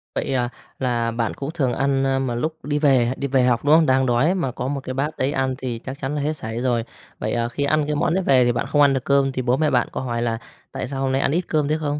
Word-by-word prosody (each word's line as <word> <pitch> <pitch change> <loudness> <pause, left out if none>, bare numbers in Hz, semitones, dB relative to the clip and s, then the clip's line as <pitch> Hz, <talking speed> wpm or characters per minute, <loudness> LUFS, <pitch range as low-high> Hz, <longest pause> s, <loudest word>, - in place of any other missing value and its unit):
Vậy - - -1
à? 120 -2 0 0.3
Là 120 -3 0
bạn 115 -1 -1
cũng 140 +2 -5
thường 135 -7 0
ăn, 135 +1 +1
a, 135 0 +1
mà 130 -3 -2
lúc 155 +6 -2
đi 145 0 0
về 130 -4 +3
đi 140 - -2
về 130 -1 +2
học, 125 0 +1
đúng 150 +2 +6
không? 160 -1 +5
Đang 130 -1 +3
đói 130 +8 +2
mà 135 -8 -1
có 125 +1 -4
một 140 0 -2
cái 130 - -4
bát 145 +4 -2
đấy 135 +2 0
ăn 130 -2 0
thì 125 -3 -4
chắc 130 +3 -7
chắn 140 +2 -2
là 145 - -1
hết 150 +2 0
sảy 115 -1 -5
rồi. 120 -2 +1 0.4
Vậy, - - -2
à, 120 0 0
khi 145 +3 -3
ăn 150 +1 +2
cái 150 - -1
món 155 - +1
đấy 190 - +1
về 130 -6 +4
thì 120 - +3
bạn 120 -1 -2
không 145 - +2
ăn 140 -1 +5
được 130 -2 -1
cơm 140 -1 +3
thì 130 - -3
bố 125 +1 +1
mẹ 155 0 +2
bạn 125 -3 +2
có - - -4
hỏi 120 -2 -2
là 115 -1 0 0.3
"Tại - - -4
sao 135 0 -4
hôm 135 -1 0
nay 135 +1 +1
ăn - - +1
ít 175 +4 +1
cơm 150 -2 +1
thế" 155 +1 +1
không? 150 -1 -2
135 Hz, 315 wpm, -22 LUFS, 125-145 Hz, 0.4 s, đúng